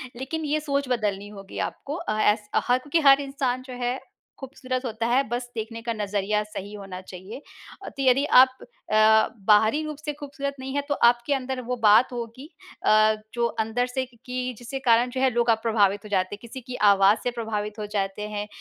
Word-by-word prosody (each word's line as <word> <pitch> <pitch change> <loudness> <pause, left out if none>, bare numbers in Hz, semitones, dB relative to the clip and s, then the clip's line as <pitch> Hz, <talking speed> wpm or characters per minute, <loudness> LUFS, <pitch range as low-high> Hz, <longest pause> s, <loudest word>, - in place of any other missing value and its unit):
लेकिन 290 +6 -4
ये 300 +1 0
सोच 280 -2 -1
बदलनी 205 -5 -1
होगी 200 -1 -11
आपको। 285 - -8
अ, 215 -10 -3
ऐस 210 0 +2 0.2
हक 255 +3 +1
कि 330 - +4
हर 275 +1 +6
इंसान 270 -2 -2
जो 255 - -7
है 245 +2 -1 0.4
खूबसूरत 255 -1 -5
होता 225 -1 -3
है, 250 +3 +3
बस 245 +1 -3
देखने 230 +1 -5
का 230 0 -2
नज़रिया 210 0 -1
सही 210 -1 -8
होना 195 -3 -8
चाहिए। 185 +7 -10 0.5
तो 275 - -5
यदि 265 +2 +4 0.2
आप 260 0 +3 0.4
अ, 220 0 +5 0.2
बाहरी 220 +7 +5
रूप 305 -2 -5
से 300 -1 -5
खूबसूरत 280 -1 -5
नहीं 265 +1 -6
है, 285 - +1
तो - - +2 0.2
आपके 240 +4 -1
अंदर 260 -1 -3
वो 250 - -1
बात 215 +4 +6
होगी 240 +5 -7 0.4
अ, 215 0 +5 0.2
जो 235 -1 0 0.2
अंदर 230 +3 -1
से 260 +1 -2
कि 245 -2 -23
कि 250 0 -3
जिसके 245 +3 -6
कारण 235 +2 +5
जो 255 +1 -4
है 265 - +4
लोग 235 0 +1
अ, 225 - +6
प्रभावित 205 -3 +2
हो 210 - -9
जाते 190 0 0
हैं। - - -20
किसी 240 +2 -9
की 250 +1 -8 0.2
आवाज़ 195 +2 +4
से 245 - 0
प्रभावित 215 -2 -4
हो 210 - -3
जाते 200 +1 -2
हैं, 210 0 -4
240 Hz, 205 wpm, -25 LUFS, 210-260 Hz, 0.5 s, हर